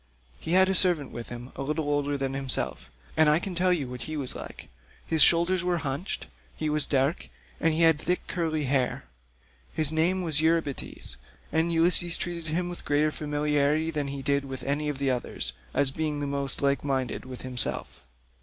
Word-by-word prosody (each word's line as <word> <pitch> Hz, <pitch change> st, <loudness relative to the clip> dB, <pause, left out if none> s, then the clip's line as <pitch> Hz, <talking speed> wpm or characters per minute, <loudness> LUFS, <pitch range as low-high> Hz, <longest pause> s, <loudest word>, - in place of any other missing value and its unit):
He 165 Hz, -, -3 dB
had 190 Hz, +1 st, +6 dB
a 190 Hz, -, +1 dB
servant 175 Hz, -7 st, +2 dB
with 120 Hz, -, -7 dB
him, 120 Hz, +1 st, -8 dB
a -, -, -6 dB
little 150 Hz, +2 st, -2 dB
older 145 Hz, -1 st, 0 dB
than 135 Hz, -1 st, -2 dB
himself, 135 Hz, -1 st, -1 dB, 0.3 s
and 155 Hz, -1 st, +5 dB
I 150 Hz, -, +5 dB
can 185 Hz, +2 st, -4 dB
tell 180 Hz, +1 st, +2 dB
you 155 Hz, -7 st, +1 dB
what 125 Hz, 0 st, -7 dB
he 155 Hz, 0 st, -5 dB
was 135 Hz, -3 st, -2 dB
like; -, -, -9 dB, 0.4 s
his 160 Hz, -1 st, +2 dB
shoulders 170 Hz, +4 st, +5 dB
were 180 Hz, -1 st, +1 dB
hunched,154 150 Hz, +3 st, -4 dB, 0.3 s
he 155 Hz, -, -1 dB
was 150 Hz, -1 st, +3 dB
dark, 140 Hz, +4 st, 0 dB, 0.3 s
and 165 Hz, -, +2 dB
he 160 Hz, +2 st, 0 dB
had 165 Hz, -2 st, +5 dB
thick 180 Hz, -, -1 dB
curly 160 Hz, -4 st, -1 dB
hair. 130 Hz, -2 st, 0 dB, 0.7 s
His 155 Hz, -1 st, +3 dB
name 180 Hz, +4 st, +1 dB
was 155 Hz, -3 st, +1 dB
Eurybates, 160 Hz, -, -1 dB, 0.3 s
and 160 Hz, +1 st, +1 dB
Ulysses 170 Hz, +1 st, +5 dB
treated 170 Hz, -2 st, -5 dB
him 175 Hz, +3 st, -1 dB
with 175 Hz, 0 st, -7 dB
greater 150 Hz, +1 st, +2 dB
familiarity 150 Hz, +1 st, 0 dB
than 150 Hz, -3 st, -2 dB
he 140 Hz, 0 st, -5 dB
did 140 Hz, 0 st, +1 dB, 0.2 s
any 145 Hz, +2 st, -1 dB
of 145 Hz, -, -3 dB
the 135 Hz, -1 st, +1 dB
others, 95 Hz, -, -3 dB, 0.2 s
as 135 Hz, -, +1 dB
being 150 Hz, 0 st, -2 dB
the 145 Hz, -, -2 dB
most 140 Hz, -1 st, -3 dB
like 140 Hz, 0 st, +2 dB
minded 135 Hz, -2 st, -2 dB
with 130 Hz, -1 st, -9 dB
himself." 125 Hz, -1 st, -3 dB
150 Hz, 190 wpm, -27 LUFS, 140-165 Hz, 0.7 s, had